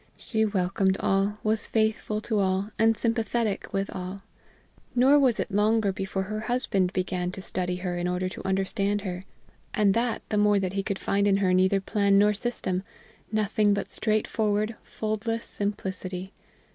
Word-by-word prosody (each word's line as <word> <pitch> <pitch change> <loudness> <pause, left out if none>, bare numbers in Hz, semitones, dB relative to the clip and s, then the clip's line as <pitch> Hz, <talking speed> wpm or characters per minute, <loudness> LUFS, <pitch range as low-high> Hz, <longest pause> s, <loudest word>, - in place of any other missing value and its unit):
She 220 -2 0
welcomed 190 -1 +1
all, 195 +2 +1
was 215 0 +1
faithful 215 -1 0
to 215 -1 -1
all, 190 +2 0
and 225 0 +4
sympathetic 225 -2 -1
with 195 -1 -1
all. 185 +2 -6 0.7
Nor 265 +4 +6
was 255 -5 +3
it - - -2
longer 210 0 +2
before 190 0 -3
her 215 +3 -4
husband 215 -5 0
began 180 -1 -2
to - - -6
study 180 -1 -2
her 180 -1 -3
in 175 - -1
order 180 +1 -1
to 190 - -7
understand 195 +2 0
her 185 -1 -5 0.5
and 205 -2 +4
that 230 0 0
the 210 - 0
more 205 0 +4
that 190 -1 -1
he 200 - 0
could 200 0 -3
find 200 +1 +1
in 195 -1 +4
her 190 -2 +2
neither 185 +2 +3
plan 200 0 +2
nor 210 +1 +5
system, 200 -4 -2 0.5
nothing 210 -1 +2
but 200 - -4
straightforward, 215 0 0
foldless 220 +1 -3
simplicity. 190 -2 -2
200 Hz, 165 wpm, -27 LUFS, 190-215 Hz, 0.7 s, Nor